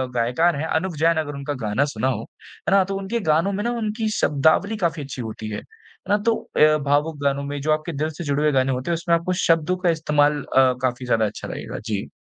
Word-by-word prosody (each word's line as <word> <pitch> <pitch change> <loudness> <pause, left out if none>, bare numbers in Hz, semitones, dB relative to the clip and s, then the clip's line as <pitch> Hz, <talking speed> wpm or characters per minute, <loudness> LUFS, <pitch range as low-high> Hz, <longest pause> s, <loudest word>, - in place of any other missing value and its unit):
गायकार 125 +9 +2
हैं 155 - -2
अनूव 170 +2 -1
जैन 165 +2 +3
अगर 145 - -6
उनका 140 +1 -4
गाना 105 +7 +1
सुना 130 - 0
हो 120 -5 -1 0.5
है - - 0
ना 195 - +6
तो 195 +1 -4
उनके 195 +4 -2
गानों 165 +6 +2
में 205 +2 -2
ना 240 - 0
उनकी 220 0 -2
शब्दावली 160 +9 +2
काफ़ी 165 -5 -1
अच्छी 135 -2 -6
होती 110 -1 -6
है। 105 - -4
है 450 0 -16
ना? - - +5
तो 230 0 +3 0.2
अ, 155 0 +6
भावुक 145 +2 +1
गानों 140 0 +1
में 145 0 -4
जो 155 +2 0
आपके 155 +2 0
दिल 155 +2 0
से - - -5
जुड़े 145 -1 0
हुए 150 - +3
गाने 135 -1 +2
होते 130 +5 -2
हैं - - +2
उसमें 170 +1 +1
आपको 170 +2 -1
शब्दों 165 +1 +2
का 180 -1 +1
इस्तेमाल 150 -2 +2
अ, 130 -1 +3
काफ़ी 125 0 -1
ज़्यादा 115 -3 +2
अच्छा 105 - -5
लगेगा। - - -6
जी। 105 -4 -3
155 Hz, 240 wpm, -22 LUFS, 135-175 Hz, 0.5 s, ना